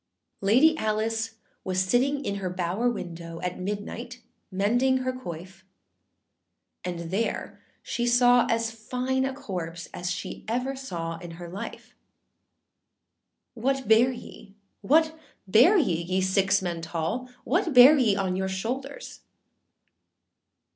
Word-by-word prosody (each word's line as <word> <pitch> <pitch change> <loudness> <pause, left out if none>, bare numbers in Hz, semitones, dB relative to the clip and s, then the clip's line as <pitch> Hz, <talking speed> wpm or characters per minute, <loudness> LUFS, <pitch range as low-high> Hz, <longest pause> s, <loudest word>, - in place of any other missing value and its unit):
] - - -48
LADY 310 +8 +6
ALICE 220 +1 -1 0.3
was 185 0 -1
sitting 255 +9 +1
in 200 - -2
her 190 -2 -3
bower 180 +6 0
window, 170 -6 -6
At 180 0 -3
midnight 205 +2 -5 0.3
mending 245 +7 +1
her 255 - 0
quoif; 185 -6 -8 1.2
And 170 -2 -5
there 220 +4 -2 0.2
she 240 0 -2
saw 245 0 +5
as 230 0 +1
fine 255 +4 -2
a 265 - -2
corpse 175 -8 -6
As 180 -1 -4 0.4
ever 250 +4 -1
she 265 - -9
saw 165 -3 -4
in 175 -2 -9
her 175 0 -8
life. 185 +4 -8 1.6
âWhat 265 +1 -1
bear 225 +4 +5
ye, 205 -4 -11 0.3
what 315 +8 +3 0.3
bear 250 - +6
ye, 175 - +1
ye 185 +2 -1
six 190 +1 +2
men 170 -2 -3
tall? 165 +10 -3
What 330 - +1
bear 255 +5 +10
ye 235 -8 +3
on 190 -2 -1
your 190 0 -1
shouldèrs? 250 +9 -5
215 Hz, 130 wpm, -26 LUFS, 180-250 Hz, 1.6 s, bear